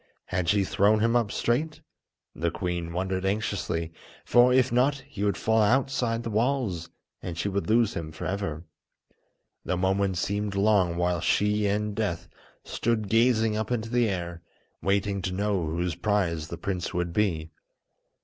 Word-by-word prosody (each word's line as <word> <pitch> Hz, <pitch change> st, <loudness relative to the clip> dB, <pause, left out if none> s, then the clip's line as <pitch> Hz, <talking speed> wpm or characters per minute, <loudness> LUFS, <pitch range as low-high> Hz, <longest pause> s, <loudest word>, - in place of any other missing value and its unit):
Had 90 Hz, -2 st, -1 dB
she 100 Hz, -1 st, +3 dB
thrown 105 Hz, +3 st, +3 dB
him 115 Hz, +2 st, +2 dB
up 115 Hz, -4 st, +2 dB
straight? 150 Hz, +7 st, -1 dB, 0.5 s
the -, -, -1 dB
queen 85 Hz, -2 st, -3 dB
wondered 95 Hz, +1 st, -2 dB
anxiously, 95 Hz, -5 st, -2 dB, 0.3 s
for, 120 Hz, +1 st, +5 dB
if 130 Hz, -1 st, +3 dB
not, 135 Hz, +3 st, +2 dB
he 110 Hz, -8 st, -5 dB
would 100 Hz, -1 st, +1 dB
fall 110 Hz, 0 st, +2 dB
outside 120 Hz, 0 st, +1 dB
the 115 Hz, -, -4 dB
walls, 110 Hz, -7 st, 0 dB, 0.3 s
and 85 Hz, -2 st, -6 dB
she 90 Hz, -, -1 dB
would 100 Hz, +1 st, -2 dB
lose 115 Hz, 0 st, +3 dB
him 80 Hz, -2 st, -5 dB
for 80 Hz, -, -7 dB
ever. 95 Hz, -5 st, -3 dB, 1.0 s
The 90 Hz, -, -1 dB
moments 95 Hz, 0 st, +1 dB
seemed 100 Hz, +2 st, -2 dB
long 100 Hz, -4 st, +3 dB
while 90 Hz, -1 st, 0 dB
she 105 Hz, +3 st, +2 dB
and 105 Hz, +1 st, -1 dB
Death 105 Hz, -6 st, -2 dB, 0.4 s
stood 110 Hz, -3 st, -1 dB
gazing 115 Hz, -1 st, +3 dB
up 110 Hz, 0 st, -2 dB
into 115 Hz, -2 st, -1 dB
the 120 Hz, -2 st, +2 dB
air, 85 Hz, -3 st, -4 dB, 0.4 s
waiting 100 Hz, 0 st, 0 dB
to 90 Hz, 0 st, -3 dB
know 100 Hz, -3 st, 0 dB
whose 85 Hz, +2 st, -1 dB
prize 85 Hz, -6 st, 0 dB
the 85 Hz, -, -6 dB
prince 90 Hz, 0 st, -3 dB
would 90 Hz, -1 st, -1 dB
be. 85 Hz, -6 st, 0 dB
100 Hz, 160 wpm, -27 LUFS, 90-110 Hz, 1.0 s, for